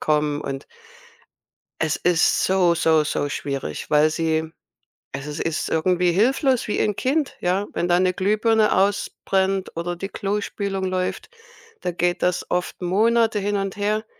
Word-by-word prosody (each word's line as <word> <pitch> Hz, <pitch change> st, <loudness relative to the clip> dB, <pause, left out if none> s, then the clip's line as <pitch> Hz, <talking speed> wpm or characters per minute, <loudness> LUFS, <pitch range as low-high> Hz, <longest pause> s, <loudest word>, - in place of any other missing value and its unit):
kommen 150 Hz, -1 st, 0 dB
und 135 Hz, 0 st, -5 dB, 1.2 s
es 160 Hz, -1 st, 0 dB
ist 175 Hz, -1 st, +2 dB
so, 185 Hz, -2 st, +3 dB
so, 160 Hz, -2 st, +3 dB
so 145 Hz, -1 st, -1 dB
schwierig, 140 Hz, -1 st, -4 dB
weil 150 Hz, +1 st, +4 dB
sie 160 Hz, 0 st, -1 dB, 0.6 s
also, 140 Hz, +2 st, -5 dB
sie 145 Hz, -, -3 dB
ist 165 Hz, -1 st, -2 dB
irgendwie 180 Hz, +2 st, +2 dB
hilflos 255 Hz, -, +2 dB
wie -, -, -1 dB
'n 210 Hz, -, +1 dB
Kind. 280 Hz, +2 st, 0 dB
Ja, 190 Hz, +3 st, 0 dB
wenn 175 Hz, -, -1 dB
da 175 Hz, 0 st, +3 dB
'ne 185 Hz, 0 st, +2 dB
Glühbirne 215 Hz, +3 st, +2 dB
ausbrennt 195 Hz, -1 st, 0 dB
oder 175 Hz, +1 st, -2 dB
die 195 Hz, +3 st, -6 dB
Klospülung 200 Hz, -1 st, -3 dB
läuft, 185 Hz, -, -2 dB, 0.5 s
dann 180 Hz, -1 st, -4 dB
geht 175 Hz, 0 st, 0 dB
das 180 Hz, -1 st, 0 dB
oft 180 Hz, +1 st, -2 dB
Monate 220 Hz, +4 st, +2 dB
hin 205 Hz, +1 st, -1 dB
und 195 Hz, -1 st, -2 dB
her. 210 Hz, +2 st, 0 dB
185 Hz, 150 wpm, -22 LUFS, 160-205 Hz, 1.2 s, weil